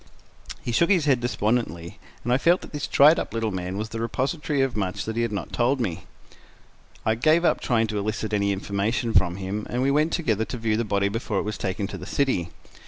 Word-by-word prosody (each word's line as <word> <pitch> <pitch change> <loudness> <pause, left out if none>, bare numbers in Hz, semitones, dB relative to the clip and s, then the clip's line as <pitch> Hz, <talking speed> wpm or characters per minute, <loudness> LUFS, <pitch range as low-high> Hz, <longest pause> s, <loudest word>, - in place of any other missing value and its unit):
He 120 - -2
shook 170 +9 +3
his 180 -6 +3
head 135 -4 +3
despondently, 110 -7 -1 0.2
and 120 - +1
I 125 - +3
felt 175 +5 +3
that - - -11
this 145 -1 -3
dried 150 +4 +6
up - - -5
little 115 -1 -1
man 95 0 -4
was 110 +1 -3
the 115 - -5
repository 140 +5 -1
of 135 -4 0
much 95 -4 -2
that 110 - -4
he 115 - 0
had 115 -2 0
not 100 - -5
told 125 +3 +2
me. 95 -9 -3 1.0
I 110 - +3
gave 155 +9 +3
up - - +2
trying 115 -2 +2
to 105 -1 -2
elicit 105 +1 -3
any 100 -1 +2
information 100 +4 -1
from 90 -1 +3
him, 100 +2 -4
and 125 +1 -1
we 135 - +2
went 155 +3 +2
together 110 - 0
to 125 - -5
view 110 -2 0
the 115 - 0
body 100 -2 +1
before 110 0 -2
it - - +1
was 105 +1 -4
taken 100 +1 -2
to 95 -1 -6
the 90 - -8
city. 115 -12 0
110 Hz, 235 wpm, -25 LUFS, 100-130 Hz, 1.0 s, dried